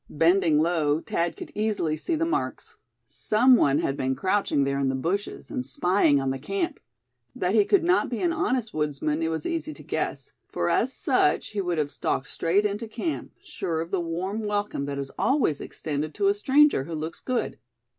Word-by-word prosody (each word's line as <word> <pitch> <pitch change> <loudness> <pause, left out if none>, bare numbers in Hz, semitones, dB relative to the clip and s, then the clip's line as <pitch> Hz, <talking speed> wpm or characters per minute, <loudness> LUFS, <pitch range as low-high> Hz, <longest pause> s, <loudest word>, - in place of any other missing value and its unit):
Bending 165 0 +3
low, 155 -2 +2
Thad 170 +1 -2
could - - -8
easily 210 -7 0
see 240 - -2
the 325 +1 0
marks. 335 +2 -3 0.3
Some 250 +4 +3
one 140 - +3
had 135 - 0
been 130 -1 -1
crouching 185 -2 +1
there 140 0 0
in 135 -1 +1
the 130 - 0
bushes, 170 +3 -3
and 125 - -2
spying 150 +2 +2
on 135 -1 -1
the 135 - -4
camp. 200 - -2 0.6
That 180 +2 0
he 210 -2 +5
could 385 - +3
not 355 +2 +2
be 240 - -3
an 340 -1 +2
honest 260 - -1
woodsman 150 +1 -1
it 165 - +1
was 160 -2 -3
easy 320 -2 -3
to - - -12
guess, - - -3
for - - -1
as - - +2
such - - +2
he 210 -2 -2
would 175 -3 -1
have 145 -2 -1
stalked 135 - -2
straight 190 +6 +1
into 210 +3 -2
camp, 245 +9 -4
sure 165 -2 -3
of 165 +1 -4
the 190 - 0
warm 175 +5 -3
welcome 205 -8 -2
that 140 0 -4
is 140 -1 -4
always 260 - +2
extended 150 0 -4
to 200 -1 +2
a - - +4
stranger 265 - +4
who 165 - -5
looks 155 +2 -5
good. 255 -2 -2
175 Hz, 200 wpm, -26 LUFS, 150-215 Hz, 0.6 s, he